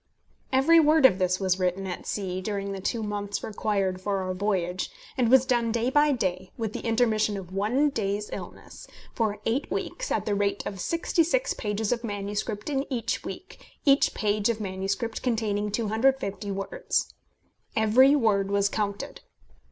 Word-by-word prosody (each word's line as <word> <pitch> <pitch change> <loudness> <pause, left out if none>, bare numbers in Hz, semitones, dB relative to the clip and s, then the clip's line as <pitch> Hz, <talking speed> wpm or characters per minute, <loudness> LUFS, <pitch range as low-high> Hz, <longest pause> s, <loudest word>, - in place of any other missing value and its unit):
Every 280 +6 +6
word 310 -2 +5
of 190 -7 +6
this 185 0 +1
was 190 -1 +1
written 185 +1 0
at 180 -2 -6
sea, 185 -2 -3
during 200 0 -3
the 195 -1 -5
two 225 +3 -1
months 205 -1 -3
required 195 -3 -1
for 195 0 -1
our 185 0 -2
voyage, 185 -2 -1 0.3
and 245 -3 +2
was 265 +1 +6
done 240 -3 +1
day 235 +2 0
by 295 +1 +4
day 185 -7 -2
with 220 -3 -3
the - - -4
intermission 220 -3 +1
of 185 -1 -8
one 235 +10 +2
day's 205 -2 -2
illness - - -9 0.3
for 215 -3 0
eight 240 +6 0
weeks, - - -3
at - - 0
the 210 - 0
rate 200 0 0
of 195 - -5
66 335 - +1
pages 210 +1 -2
of 240 -1 -1
manuscript 205 0 -3
in 280 -1 -2
each 240 -3 -2
week, - - -9 0.2
every 275 -1 +5
page 210 0 +1
of 225 -2 -1
manuscript 195 +3 -3
containing 215 -4 0
250 220 -1 0
words. 200 - -2 0.6
Every 245 +6 +5
word 205 -7 +2
was 200 0 +2
counted. 205 -1 -3
210 Hz, 165 wpm, -27 LUFS, 195-245 Hz, 0.6 s, Every